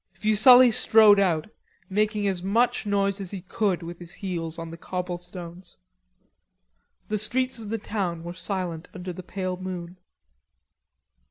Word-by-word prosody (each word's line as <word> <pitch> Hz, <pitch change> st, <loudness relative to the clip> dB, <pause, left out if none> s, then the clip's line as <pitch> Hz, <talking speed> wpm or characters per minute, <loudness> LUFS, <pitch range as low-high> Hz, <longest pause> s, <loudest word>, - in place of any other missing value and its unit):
Fuselli 240 Hz, +4 st, +7 dB
strode 215 Hz, -2 st, +6 dB
out, 170 Hz, -6 st, +1 dB, 0.4 s
making 210 Hz, +1 st, 0 dB
as 190 Hz, -3 st, -1 dB
much 215 Hz, +3 st, +1 dB
noise 200 Hz, 0 st, 0 dB
as 190 Hz, -, -5 dB
he 195 Hz, -1 st, -6 dB
could 190 Hz, -1 st, -1 dB
with 170 Hz, +1 st, -8 dB
his 175 Hz, -1 st, -11 dB
heels 170 Hz, -4 st, -4 dB
on 165 Hz, -1 st, -7 dB
the -, -, -7 dB
cobble 180 Hz, 0 st, -4 dB
stones. 175 Hz, 0 st, -10 dB, 1.3 s
The 215 Hz, 0 st, -1 dB
streets 255 Hz, +3 st, -1 dB
of 215 Hz, -2 st, -8 dB
the 225 Hz, -, -1 dB
town 190 Hz, -6 st, -3 dB
were 170 Hz, 0 st, -6 dB
silent 180 Hz, -2 st, -4 dB
under 180 Hz, -1 st, -6 dB
the 185 Hz, -, -8 dB
pale 185 Hz, 0 st, -4 dB
moon. 180 Hz, -1 st, -7 dB
185 Hz, 150 wpm, -25 LUFS, 175-210 Hz, 1.3 s, Fuselli